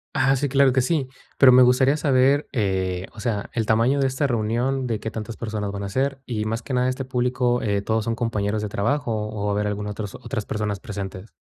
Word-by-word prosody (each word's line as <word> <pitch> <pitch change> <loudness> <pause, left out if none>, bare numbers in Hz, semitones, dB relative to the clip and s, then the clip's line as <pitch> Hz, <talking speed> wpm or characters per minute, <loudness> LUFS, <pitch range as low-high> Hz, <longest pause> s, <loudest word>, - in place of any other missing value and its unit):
Ah, 135 -1 +3
sí, 140 +1 -1
claro 135 -1 +4
que 130 - +3
sí, 140 -1 0 0.3
pero 130 -2 +8
me 125 +1 +7
gustaría 130 +3 +4
saber, 140 -1 +3
eh, 95 -5 -1
o 110 - -12
sea, 105 -3 -2
el 115 -2 -1
tamaño 115 +6 +3
de 135 - +3
esta 130 +2 -1
reunión, 125 +2 0
de 110 -3 -2
qué 110 - -5
tantas 110 +1 -6
personas 105 -3 -3
van 100 0 -5
a 100 - -4
ser, 135 +4 -1
y 110 -3 -3
más 115 +2 -2
que 135 - -5
nada 125 0 +2
este 130 +1 -3
público, 125 -1 0
eh, 100 -2 0
¿todos 110 0 0
son 115 0 -1
compañeros 105 -2 -1
de 105 - -3
trabajo 120 +6 -1 0.2
o 105 -1 -4
va 105 - 0
a - - 0
haber 105 0 0
algún 105 0 -3
otros 105 -1 -5
otras 110 -3 -5
personas 105 -2 -2
presentes? 100 0 -7
115 Hz, 235 wpm, -23 LUFS, 105-130 Hz, 0.3 s, pero